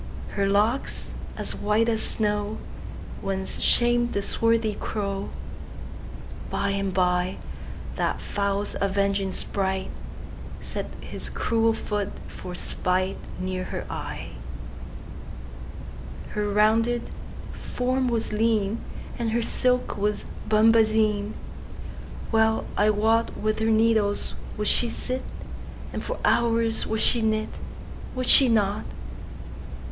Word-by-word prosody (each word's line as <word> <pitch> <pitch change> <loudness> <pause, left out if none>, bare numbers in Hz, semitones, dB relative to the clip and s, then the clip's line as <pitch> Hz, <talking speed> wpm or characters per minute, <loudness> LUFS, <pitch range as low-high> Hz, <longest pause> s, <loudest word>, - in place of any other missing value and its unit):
Her 200 -1 0
locks, 215 +6 +1 0.2
as - - -2
white 210 +2 +1
as 225 -1 +2
snow, 210 -1 +1 0.6
Once 190 0 -3
sham'd 240 0 +4
the 200 - 0
swarthy 230 0 +2
crow:By 200 0 -5
and 195 -1 -1
byThat 180 0 -2
fowl's 200 0 -1
avenging 200 0 +1
spriteSet 190 0 -1 1.1
his - - -6
cruel 225 -1 +2
foot 210 -2 -2 0.2
for 180 - -8
spiteNear 185 0 -2
her - - -4
eye. - - -5 2.0
Her 210 0 -1
rounded 225 +3 +2 0.4
form 255 +1 -1
was 230 -3 0
lean, 220 -1 +1 0.4
And 235 -1 0
her 235 0 +1
silk 250 0 +1
was 210 +1 0 0.2
bombazine:Well 220 0 +1
I 210 +1 +4
wotWith 215 0 +1
her 220 0 +2
needles 220 -2 +3 0.2
would 210 0 0
she 240 - +5
sit, 255 +3 -3 0.7
And - - -3
for - - -3
hours 230 -1 +2
would 220 0 0
she 235 - +4
knit,—Would 220 +3 -4
she 260 +1 +7
not? 210 -2 +2
215 Hz, 95 wpm, -26 LUFS, 200-230 Hz, 2.0 s, she